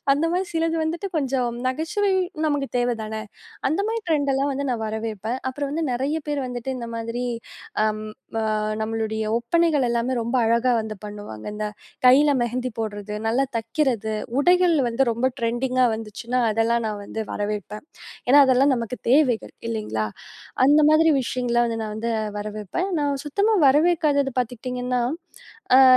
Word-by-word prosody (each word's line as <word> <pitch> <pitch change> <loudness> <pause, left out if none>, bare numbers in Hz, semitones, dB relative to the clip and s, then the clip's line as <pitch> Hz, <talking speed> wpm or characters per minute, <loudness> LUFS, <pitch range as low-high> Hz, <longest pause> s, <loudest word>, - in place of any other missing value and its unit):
அந்த 290 +3 0
மாதிரி 370 +1 0
சிலது 330 0 0
வந்துட்டு 335 +4 -2
கொஞ்சம் 265 -4 0 0.2
நகைச்சுவை 365 +9 0 0.4
நமக்கு 285 -2 -1
தேவதான. 230 -3 -1 0.6
அந்த 320 - +1
மாதிரி 455 +1 -1
ட்ரெண்டெல்லாம் 280 -2 +1
வந்து 280 +1 -2
நான் 230 -2 -3
வரவேற்பேன். 220 +2 -3
அப்புறம் 280 +1 -4
வந்து 325 +2 -1
நெறைய 270 +5 -1
பேர் 290 -2 -1
வந்துட்டு 245 +1 -4
இந்த 235 - -5
மாதிரி 230 +2 -3 0.6
அம் 215 0 0 0.3
ம - - 0 0.4
நம்மளுடைய 220 0 -2
ஒப்பனைகள் 300 +3 +2
எல்லாமே 235 +2 0
ரொம்ப 235 +3 -1
அழகா 235 +3 +3
வந்து 215 -1 -5
பண்ணுவாங்க. 205 - -8
அந்த 210 0 -3 0.4
கைல 275 +4 +7
மெஹந்தி 250 +2 -2
போடுறது, 210 -1 -4
நல்லா 240 +5 +2
தக்கிறது, 230 -2 0 0.3
உடைகள் 355 +3 +4
வந்து 235 +3 +1
ரொம்ப 235 +3 0
ட்ரெண்டிங்கா 250 +2 +1
வந்துச்சுனா, 225 +3 -4
அதெல்லாம் 225 +2 +1
நான் 210 -1 -3
வந்து 220 - -5
வரவேற்பேன். 210 +1 -4 0.4
ஏன்னா 280 +3 +7
அதெல்லாம் 265 +2 +4
நமக்கு 235 0 -3
தேவை. 265 -3 +5 0.3
இல்லைங்களா? 210 - -2 0.6
அந்த 295 +3 +6
மாதிரி 315 +1 +5
விஷயங்கள்லாம் 240 -1 0
வந்து 225 -1 -3
நான் 215 -1 -4
வந்து 230 +2 -2 0.3
வரவேற்பேன். 210 - -3
நான் 285 -1 0
சுத்தமா 400 +9 +2
வரவேற்காதது 290 -2 +3
பாத்துக்கிட்டீங்கன்னா, 250 +1 -2 0.8
ஆ - - +9
245 Hz, 145 wpm, -23 LUFS, 225-285 Hz, 0.8 s, ஆ